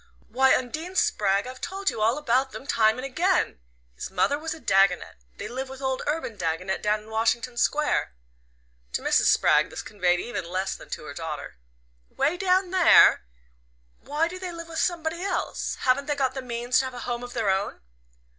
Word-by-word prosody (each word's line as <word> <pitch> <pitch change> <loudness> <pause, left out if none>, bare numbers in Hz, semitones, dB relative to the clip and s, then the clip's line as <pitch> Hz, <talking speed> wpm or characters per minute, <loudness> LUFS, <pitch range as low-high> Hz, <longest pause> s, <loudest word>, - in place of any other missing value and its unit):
"Why, 265 +1 +4
Undine 315 +9 -5
Spragg, 200 - +2
I've 255 +1 -9
told 390 +1 -2
you 215 - -6
all 225 +5 +3
about 265 -2 +1
them - - -8
time 220 -5 +3
and 255 - -5
again! 340 - +1 0.3
His - - -7
mother 195 +10 +1
was 320 +1 -5
a - - -12
Dagonet. 195 - +2 0.2
They - - -5
live 260 +2 -5
with 265 0 -9
old 265 -1 -2
Urban 295 -8 -2
Dagonet 180 +2 -2
down 210 0 +1
in 215 - -15
Washington 230 +2 0
Square." 290 - +1 0.8
To - - -2
Mrs. - - +3
Spragg - - +4
this - - -7
conveyed 180 -3 +1
even 240 -4 -4
less 185 +2 -2
than - - -13
to - - -5
her - - -8
daughter, 65 - -6 0.5
"'way 315 - 0
down 370 0 +1
there? 365 - +6 0.7
Why 305 +3 -1
do 365 +2 -7
they 365 -1 -5
live 335 0 -8
with 325 - -4
somebody 335 -1 -1
else? 380 -1 -2
Haven't 280 +3 +2
they 295 - 0
got 265 -2 0
the 265 - -4
means 240 0 0
to 265 - 0
have 260 -1 -6
a - - -6
home 240 -1 -3
of 245 - -8
their 225 -5 +1
own?" 195 +1 -2
255 Hz, 195 wpm, -25 LUFS, 215-320 Hz, 0.8 s, there